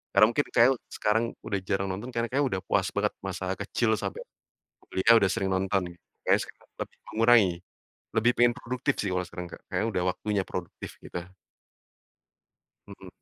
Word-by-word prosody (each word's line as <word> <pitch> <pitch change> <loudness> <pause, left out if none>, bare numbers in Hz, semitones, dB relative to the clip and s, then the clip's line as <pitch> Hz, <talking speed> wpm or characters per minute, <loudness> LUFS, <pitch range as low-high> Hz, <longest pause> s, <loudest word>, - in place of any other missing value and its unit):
karena - - +8
mungkin 145 +3 +1
kayak 120 +2 +7 0.3
sekarang 110 +2 +2 0.2
udah 100 - 0
jarang 95 0 +1
nonton, 105 +7 -5
karena 115 0 0
kayak 140 +2 +2
udah 95 -4 -2
puas 95 -2 +2
banget 105 0 +1 0.2
masa 95 0 -4
kecil 110 +3 0
sampai - - -4 0.6
kuliah 95 +5 +3
udah 95 - +2
sering 95 - -1
nonton, 95 0 +1 0.4
kayak - - +3
sekarang - - -17 0.2
lebih - - -27
mengurangi, 110 -3 +5 0.7
lebih 115 +2 +4
pengen 120 0 +6
produktif 125 0 -1
sih 100 - -1
kalau 90 0 -1
sekarang 90 0 -7
Kak. - - -9
Kayaknya - - -1
udah 90 -3 0
waktunya 105 -2 -1
produktif 90 -2 -6
gitu. - - -5 1.7
Mhm. 100 -2 -11
100 Hz, 165 wpm, -28 LUFS, 95-115 Hz, 1.7 s, karena